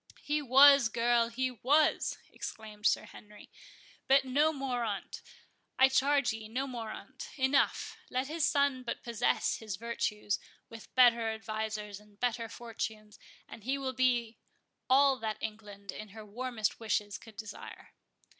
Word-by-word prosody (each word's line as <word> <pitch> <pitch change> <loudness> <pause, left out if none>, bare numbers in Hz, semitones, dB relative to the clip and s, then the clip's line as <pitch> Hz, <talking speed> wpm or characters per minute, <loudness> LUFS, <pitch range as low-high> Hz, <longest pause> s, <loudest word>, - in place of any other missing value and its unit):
"He 300 +1 0
was, 275 -1 +7
girl, 235 0 +2
he 255 +2 -1
was!" 280 +6 +2 0.2
exclaimed 210 -1 -4
Sir - - +1
Henry; 210 0 -14 0.6
"but 270 0 +5
no 290 +5 +3
more 265 -4 -2
on't, 205 -4 -4 0.6
I 265 0 +6
charge 275 -1 +2
ye—no 225 +4 -4
more 240 -4 -6
on't—enough; 265 +4 -1
let 255 +1 -1
his 315 +3 -3
son 280 -3 +2
but 235 -2 -5
possess 235 0 0
his 215 -4 -5
virtues, 210 -1 -2 0.3
with 225 -1 -12
better 235 -3 +5
advisers, 215 -2 -4
and 210 -1 -22
better 235 -2 -1
fortunes, 220 -2 -6 0.3
and 225 - -11
he 265 +4 -1
will 265 -1 -3
be 240 -3 +1 0.5
all 270 0 +5
that 220 -2 -3
England, 205 -2 -7
in 215 0 -9
her 215 +1 -11
warmest 230 0 -3
wishes, 210 -2 -1
could 220 -2 -15
desire." 215 -1 -9
235 Hz, 140 wpm, -31 LUFS, 215-265 Hz, 0.6 s, was